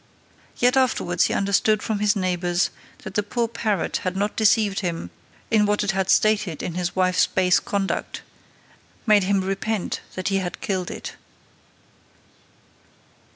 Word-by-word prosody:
Yet 245 +1 +3
afterwards 180 -9 +2
he - - -1
understood 200 +2 +2
from 215 -2 -2
his 210 +1 +2
neigbours, 180 -2 0 0.3
that - - -7
the 210 - +1
poor 230 +3 -1
parrot 220 -5 -1
had 185 0 -3
not 205 +1 -1
deceived 215 -2 +3
him 165 - -4 0.4
in 210 -2 +4
what 210 0 +1
it 205 - +1
had 190 -1 -1
stated 205 -5 +2
of 175 - -3
his 175 0 -3
wife's 185 -1 +3
base 180 -1 +3
conduct, 200 -1 -3 0.8
made 210 -4 +4
him 195 0 +2
repent 195 +1 -2
that 185 +1 -2
he 195 - +1
had 180 -2 -4
killed 185 -3 -2
it. - - -7
195 Hz, 150 wpm, -23 LUFS, 185-210 Hz, 0.8 s, in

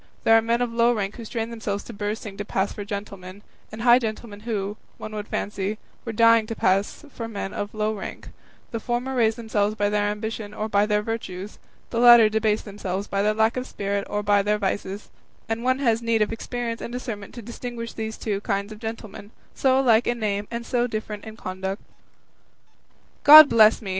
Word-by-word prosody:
There 225 - +6
are 225 - +6
men 235 +2 +1
of 235 -1 -4
low 235 +1 +4
rank 200 -3 -3
who 230 - -8
strain 225 +1 -4
themselves 210 -3 -4
to 235 - -10
bursting 205 0 -4
to 205 - -3
pass 195 -1 -1
for 205 - -6
gentlemen, 200 -1 -7 0.3
and 220 +1 -7
high 240 0 +7
gentlemen 220 -2 -5
who, 210 -2 -3 0.2
one 215 - -8
would 210 0 -5
fancy, 205 +1 -3 0.3
were 230 - -3
dying 230 0 +4
to 225 - -4
pass 195 +10 0
for 230 - -5
men 200 -3 -5
of 205 +1 -5
low 215 0 0
rank; 205 - -7 0.4
the 230 - -3
former 240 +3 -2
raise 225 -3 +3
themselves 215 -2 -1
by 205 -1 +1
their 205 0 +1
ambition 210 0 -4
or 215 - -2
by 205 -1 +2
their 210 -1 +1
virtues, 210 -3 -5 0.3
the 230 - -1
latter 240 -2 +8
debase 215 0 +1
themselves 200 -2 -4
by 200 -1 -1
their 210 +1 +1
lack 220 +2 +2
of 255 - -3
spirit 200 0 -3
or 210 0 -2
by 205 0 +3
their 210 +1 +1
vices; 200 0 -3 0.4
and 225 +1 -3
one 255 +1 +2
has 235 -4 +1
need 230 -2 +2
of 210 - -3
experience 235 0 -4
and - - -6
discernment 230 -5 -6
to 235 - -8
distinguish 235 0 -6
these 220 0 -5
two 205 -3 -3
kinds 200 0 -2
of 210 - -13
gentlemen, 220 -2 -7 0.2
so 260 -1 +2
much 270 - +3
alike 230 -2 +4
in 240 - 0
name 205 -2 -2
and 235 0 -5
so 245 -1 0
different 215 -2 -5
in 220 0 -9
conduct." 190 0 -4 1.4
"God 305 0 +11
bless 220 0 +5
me!" 195 - -5
215 Hz, 210 wpm, -24 LUFS, 205-230 Hz, 1.4 s, God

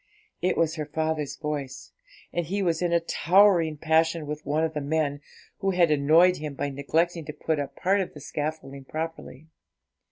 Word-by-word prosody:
It 185 - +1
was 165 0 +1
her 150 -1 -3
father's 155 -1 -2
voice, 145 -3 -5 0.4
and 170 -2 -1
he 200 +3 -1
was 170 -2 0
in 175 -1 +1
a 170 - +4
towering 170 -2 +3
passion 160 +1 +2
with 150 +1 -5
one 150 +3 +1
of 160 -1 -1
the 150 - -3
men, 145 -1 -1 0.4
who 195 - 0
had 175 -4 +3
annoyed 160 +5 +5
him 150 -2 -6
by 140 +1 -2
neglecting 165 +5 0
to 150 - -6
put 160 0 -2
up 145 - -4
part 195 +2 +2
of 185 - -5
the - - -8
scaffolding 145 -2 -5
properly. 160 -2 -6
160 Hz, 185 wpm, -26 LUFS, 150-170 Hz, 0.4 s, annoyed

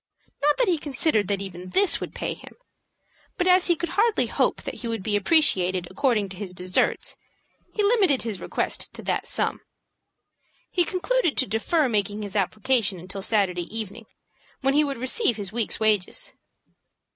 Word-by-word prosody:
Not 295 +1 +3
that - - +2
he 345 -4 +1
considered 270 - +1
that 200 0 -1
even 185 -1 -8
this 390 - +3
would - - -6
pay - - -3
him, - - -14 0.8
but 355 - 0
as 365 0 +5
he 345 - +3
could 345 +1 -4
hardly 430 +5 +2
hope - - 0
that - - -6
he 240 - -4
would 225 -4 -3
be 210 0 0
appreciated 190 - +2
according 215 -1 +1
to 185 - -9
his 190 -2 -6
deserts, 180 +1 -1 0.5
he 420 - -1
limited 405 - +3
his 220 -5 -4
request - - -2
to - - -7
that - - -2
sum. - - 0 1.1
He 350 -2 +2
concluded 365 - 0
to 260 - +5
defer 275 +7 +1
making 210 -2 -1
his 205 -1 -7
application 210 +1 +1
until 185 +3 -6
Saturday 190 -4 +1
evening, 220 0 -5 0.5
when 270 0 +2
he 300 +2 +4
would 280 -3 -3
receive 255 - +2
his 200 -1 -4
week's 230 -1 0
wages. 215 -4 +1
225 Hz, 170 wpm, -24 LUFS, 195-315 Hz, 1.1 s, as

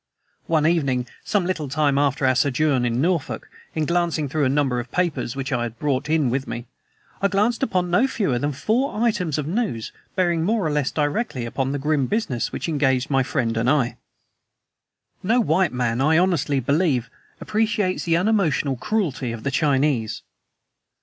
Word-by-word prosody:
One 160 -2 +2
evening, 140 -7 +1 0.2
some 205 -4 0
little 165 -6 -2
time 145 -1 +2
after 140 -1 +1
our 130 - +4
sojourn 130 0 +2
in 120 +2 0
Norfolk, 165 -1 -1 0.3
in 155 -1 0
glancing 170 -2 0
through 145 +1 0
a - - +2
number 135 -3 +1
of 120 0 -7
papers 170 -9 -1
which 135 -1 -4
I 120 -3 0
had 120 -1 -4
brought 140 +1 -1
in 155 -6 +2
with 135 +2 -2
me, 120 0 -5 0.6
I 200 - +4
chanced 210 +4 +1
upon 180 -9 0
no 210 +10 +4
fewer 195 - 0
than 145 +3 -1
four 220 - -1
items 185 -10 0
of 150 - -2
news 165 - -2 0.2
bearing 175 -3 +1
more 210 +1 +1
or 155 - 0
less 145 -2 +1
directly 145 - -1
upon 135 +3 -2
the 145 - -1
grim 145 -1 0
business 140 - -1
which - - -4
engaged 135 -4 +1
my 135 -1 +3
friend 120 -3 -1
and 115 +2 +1
I. 135 -4 +2 1.3
No 225 +6 +2
white 185 -5 +2
man, 125 -1 -1
I 155 +3 +4
honestly 155 -6 +2
believe, 135 -3 +1 0.3
appreciates 215 -3 0
the 165 -1 +3
unemotional 175 - +1
cruelty 150 - -1
of 115 -1 -7
the 140 - -1
Chinese. 135 -6 +1
150 Hz, 175 wpm, -23 LUFS, 130-180 Hz, 1.3 s, our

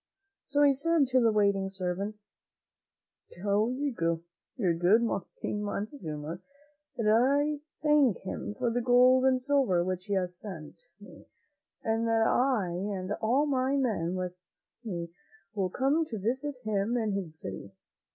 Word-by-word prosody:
So 290 +1 +2
he 285 -1 +6
said 320 +2 +2
to 260 0 +4
the 230 -1 +4
waiting 200 -2 +2
servants, 195 +2 -4 1.1
"Tell 205 +4 +1
your 275 +1 -2 0.7
good 185 +4 +3 0.3
King 210 - -3
Montezuma 175 - -5 0.6
that 230 - -1
I 280 +7 +3 0.2
thank 295 - +4
him 200 +2 -5
for 245 -2 0
the 245 +1 0
gold 250 +2 +5
and 260 -1 +4
silver 255 -10 +2
which 185 0 -3
he 205 - -2
has 180 -1 -1
sent 185 - -9
me, - - -14 0.6
and 225 +1 0
that 225 0 +3
I 245 -8 +2
and 185 +2 -3
all 255 +7 +2
my 265 -1 +1
men 205 -10 0
with 180 -1 -3 0.5
me 170 -6 -5 0.4
will 195 -4 -1
come 275 - +1
to 230 -7 -6
visit 260 +7 -2
him 215 +2 0
in 220 -3 0
his 195 -4 -3
beautiful 155 -10 -8 0.2
city." 100 - -22
220 Hz, 145 wpm, -29 LUFS, 190-260 Hz, 1.1 s, he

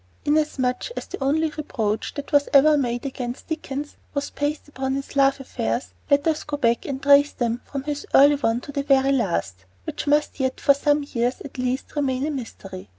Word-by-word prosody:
Inasmuch 290 - 0
as - - -4
the - - -6
only 310 +3 +1
reproach 225 -9 -3
that 285 - -6
was 285 -1 +3
ever 300 +2 +7
made 245 -2 -1
against 250 -2 -5
Dickens 295 -2 -4 0.2
was 280 0 -2
based 290 +1 -2
upon 265 -2 -3
his 275 +1 -6
love 275 0 +4
affairs, 115 - -3 0.2
let 285 0 +3
us 315 -1 +1
go 295 -1 -4
back 235 -3 +1
and 270 -2 -3
trace 285 +1 +6
them 235 0 -1
from 275 -2 -5
this 290 0 -4
early 285 +2 +8
one 235 -3 0
to 285 - -9
the 280 - -1
very 275 -1 +3
last, 170 - -1 0.2
which 290 - -5
must 295 0 +1
yet 260 -1 -1
for 280 - +5
some 290 +1 +1
years, 245 +1 0
at 270 -2 -9
least, 255 +3 -2
remain 270 -2 0
a 310 - -1
mystery. 200 - -7
275 Hz, 200 wpm, -23 LUFS, 250-290 Hz, 0.2 s, early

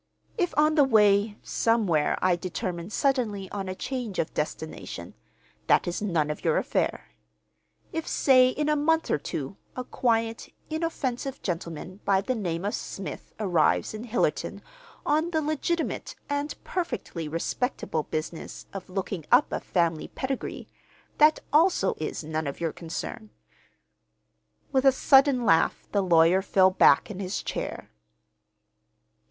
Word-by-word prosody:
If 360 -6 -1
on 305 +1 +4
the 300 -2 +5
way, 210 -4 +4
somewhere, 205 -10 +1
I 185 -1 +4
determine 175 0 -4
suddenly 215 -6 0
on 195 -2 -4
a 185 - -4
change 245 -4 -4
of 155 - -1
destination, 155 +1 -5 0.5
that - - +4
is 175 +3 -2
none 165 -7 0
of 150 - -7
your - - +2
affair. - - -1 0.8
If, 325 -1 -3
say 255 -2 +5
in 295 +3 -2
a 300 - +3
month 320 +2 +1
or - - +2
two, 145 +5 -5 0.2
a 255 - -3
quiet, 230 -2 -1 0.2
inoffensive 275 -5 -3
gentleman 170 +1 -5
by 195 -1 +3
the 255 - -1
name 180 -6 -3
of 205 - -1
Smith 195 - -6
arrives 180 -4 +2
in 215 +2 -6
Hillerton 240 0 -1 0.4
on 310 +3 +2
the 320 -2 0
legitimate 310 +2 -2
and 285 +1 -2
perfectly 185 - -3
respectable 165 - -2
business 155 +2 -5
of 195 -1 -7
looking 185 -2 -3
up 250 +4 +5
a - - -1
family 170 -3 0
pedigree, 265 0 -4 0.5
that 305 +1 +6
also 315 - +4
is 155 +1 -4
none 155 0 -3
of 140 - -5
your 165 -2 -1
concern." 175 +6 -6 1.4
With 265 -2 +2
a 270 - +8
sudden 270 -1 +4
laugh 165 -5 +3
the 200 - +2
lawyer 175 0 +5
fell 190 -1 +4
back 195 - +5
in 190 - -7
his 190 0 -3
chair. - - -5
205 Hz, 140 wpm, -27 LUFS, 175-270 Hz, 1.4 s, a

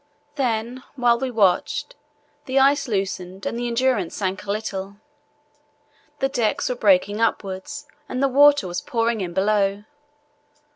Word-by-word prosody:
Then, 245 -2 -2
while 240 -2 +3
we 265 0 -2
watched, 220 - +1 0.5
the 260 +1 -1
ice 275 +1 +4
loosened 190 -3 -3
and - - -2
the 240 +1 -2
Endurance 235 -6 0
sank 190 -1 -3
a 200 - -2
little. 200 -2 -4 1.2
The 270 - +1
decks 245 -5 0
were 250 - -1
breaking 205 -1 +2
upwards 215 +6 -2 0.2
and 255 - -4
the 275 - +3
water 285 -2 +5
was 175 0 -4
pouring 230 -2 -1
in 175 -2 -5
below. 200 0 +1
225 Hz, 140 wpm, -22 LUFS, 195-255 Hz, 1.2 s, water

